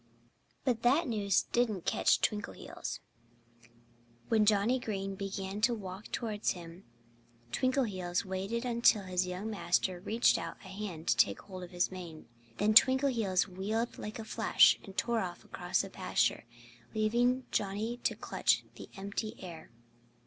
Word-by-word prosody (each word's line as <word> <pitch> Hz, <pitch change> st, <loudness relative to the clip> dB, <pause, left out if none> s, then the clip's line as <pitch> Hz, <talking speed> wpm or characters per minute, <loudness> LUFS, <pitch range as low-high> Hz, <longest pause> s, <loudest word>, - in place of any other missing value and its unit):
But 245 Hz, -4 st, +1 dB
that 275 Hz, +8 st, +3 dB
news 205 Hz, -5 st, +2 dB
didn't 220 Hz, -7 st, +1 dB
catch -, -, +3 dB
Twinkleheels. 210 Hz, -1 st, -3 dB, 1.3 s
When 215 Hz, -2 st, +3 dB
Johnnie 215 Hz, +5 st, +3 dB
Green 195 Hz, -4 st, -3 dB
began 195 Hz, +1 st, -4 dB
to 235 Hz, +2 st, +3 dB
walk 195 Hz, -1 st, -8 dB
towards 215 Hz, -3 st, -1 dB
him 170 Hz, +1 st, -11 dB, 0.7 s
Twinkleheels 200 Hz, -, 0 dB
waited 195 Hz, +6 st, -3 dB
until 235 Hz, -3 st, +4 dB
his 185 Hz, -1 st, -1 dB
young 185 Hz, +5 st, -4 dB
master 185 Hz, -2 st, 0 dB
reached 220 Hz, +4 st, +3 dB
out 165 Hz, 0 st, -6 dB
a -, -, -9 dB
hand 190 Hz, -5 st, -6 dB
to -, -, +5 dB
take 100 Hz, -, +3 dB
hold 185 Hz, -2 st, -9 dB
of 180 Hz, -, -8 dB
his 175 Hz, 0 st, 0 dB
mane. 175 Hz, -4 st, -8 dB, 0.3 s
Then 210 Hz, +1 st, +3 dB
Twinkleheels 235 Hz, -7 st, +4 dB
wheeled 210 Hz, +5 st, -3 dB
like 215 Hz, +3 st, -6 dB
a 225 Hz, -, -6 dB
flash -, -, +5 dB
and 195 Hz, -2 st, -12 dB
tore 235 Hz, +4 st, +1 dB
off 180 Hz, -4 st, -5 dB
across -, -, -1 dB
the -, -, -7 dB
pasture, -, -, 0 dB, 0.5 s
leaving 240 Hz, +4 st, +2 dB
Johnnie 210 Hz, +4 st, -1 dB
to -, -, -1 dB
clutch -, -, +1 dB
the -, -, -10 dB
empty 200 Hz, +2 st, -4 dB
air. 175 Hz, -4 st, -9 dB
205 Hz, 145 wpm, -32 LUFS, 185-230 Hz, 1.3 s, to